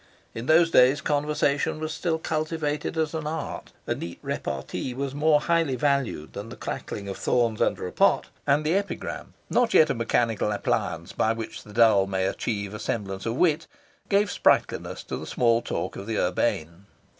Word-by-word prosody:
In 115 +2 -6
those 165 +1 +5
days 130 +3 +6
conversation 150 -1 0
was 155 0 -3
still 165 -1 -1
cultivated 155 -1 -2
as 160 -1 0
an 155 -2 -3
art; 160 +1 -5
a - - 0
neat 85 0 -6
repartee 125 - -4
was 135 0 -3
more 150 +1 +3
highly 165 -5 +1
valued 140 - 0
than 105 +3 -6
the 120 - -8
crackling 100 -1 -5
of 95 - -5
thorns 115 -3 +1
under - - +1
a 90 - -4
pot; - - +3 0.2
and 145 +2 +3
the 155 - +2
epigram, 200 +1 -3
not 245 -1 +2
yet 155 - +6
a - - +1
mechanical 115 -2 0
appliance 85 -5 -1
by 110 - +2
which 115 0 -6
the 105 - -14
dull 110 -4 +5
may 95 -1 0
achieve 100 0 -2
a 105 - -6
semblance 95 -2 -3
of 115 - -1
wit, 165 +1 +2 0.4
gave 200 -1 +3
sprightliness - - +1
to - - -5
the - - -7
small 115 -1 +2
talk - - -3
of 100 - -7
the 110 -2 -1
urbane. 90 0 -1
130 Hz, 180 wpm, -26 LUFS, 105-155 Hz, 0.4 s, days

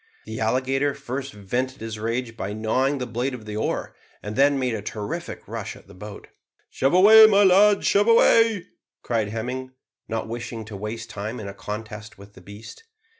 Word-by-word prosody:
The - - -6
alligator 135 +2 0
first 135 +2 -5
vented 125 +6 -3
his 110 -1 -6
rage 115 +1 -3
by 100 -3 -4
gnawing 130 +6 0
the 125 - -3
blade 125 +3 -3
of 110 -3 -11
the 105 0 -6
oar, 110 - -2 0.3
and 105 +1 -5
then 140 +1 +4
made 130 -3 -1
a 110 - -3
terrific 105 0 -6
rush - - -6
at - - -16
the 100 - -16
boat. 100 +2 -10 0.4
"Shove 135 +5 +1
away, 220 +4 +9
my 205 -1 +5
lads 200 +2 +5
shove 205 +2 +3
away," 230 -3 +4 0.4
cried 115 -3 -1
Hemming, 125 +4 -5 0.3
not 110 -1 -3
wishing 115 -1 -6
to 110 -1 -9
waste 110 +2 -6
time 105 +4 -5
in 105 - -7
a 100 - -6
contest 105 +1 -8
with 100 +1 -15
the 95 - -15
beast. 105 - -12
115 Hz, 185 wpm, -24 LUFS, 105-135 Hz, 0.4 s, away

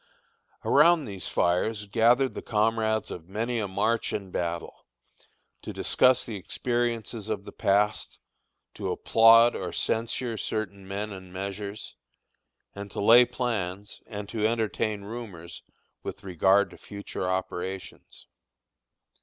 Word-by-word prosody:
Around 160 +1 +5
these 100 -5 -6
fires 100 +5 0
gathered 120 +5 +3
the - - -6
comrades 110 0 0
of 85 0 -8
many 115 +4 -2
a 105 - -1
march 110 +4 0
and 100 -3 -4
battle, 85 -1 -4 0.7
to - - -6
discuss 130 0 +3
the 110 -3 -5
experiences 115 +1 -2
of 100 -2 -3
the - - -8
past, 105 +2 +1 0.6
to - - -3
applaud 115 +1 +6
or - - -4
censure 115 0 -1
certain 100 -3 -4
men 100 +2 -4
and 95 -2 -10
measures, 100 +2 -6 0.8
and 100 0 -7
to - - -6
lay 115 +4 +7
plans, 105 -6 -3
and 105 -1 -6
to 110 -1 +1
entertain 110 -2 -1
rumors 100 -7 -8 0.4
with - - -7
regard 95 +2 +3
to - - -14
future 100 -2 -5
operations. 95 0 -5
105 Hz, 125 wpm, -27 LUFS, 95-115 Hz, 0.8 s, lay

